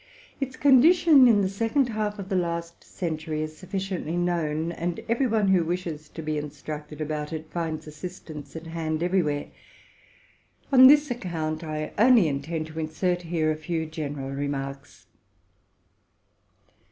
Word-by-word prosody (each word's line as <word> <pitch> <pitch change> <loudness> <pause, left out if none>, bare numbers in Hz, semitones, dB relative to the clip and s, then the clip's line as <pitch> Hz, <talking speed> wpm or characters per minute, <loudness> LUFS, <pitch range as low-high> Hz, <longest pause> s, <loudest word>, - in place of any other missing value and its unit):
Its 265 -2 -3
condition 285 +1 +6
in 215 -4 +5
the - - +2
second 230 +7 0
half 215 -1 -2
of 200 -2 -6
the 190 - 0
last 170 -1 -2
century 155 -3 -3
is 155 0 -6
sufficiently 185 -2 -4
known, 165 -2 0
and 170 0 -3
every 235 +3 +1
one 215 -4 +2
who 185 -3 +4
wishes 165 -3 -4
to 160 - -8
be 155 -1 -1
instructed 150 +1 -7
about 150 0 -3
it 160 -1 -6
finds 160 -2 -3
assist 175 +4 -9
ance 145 -1 -9
at 160 0 -7
hand 160 -1 -3
everywhere. 170 -6 +1 1.3
On 260 -1 +9
this 295 0 +6
account 165 -8 -3
I 155 -1 -4
only 235 -5 +6
intend 155 +3 -3
to 160 0 -8
insert 175 +3 -1
here 165 -2 0
a - - -1
few 160 +1 -3
general 145 -4 -5
remarks. 140 -1 -5
165 Hz, 150 wpm, -26 LUFS, 155-195 Hz, 1.3 s, On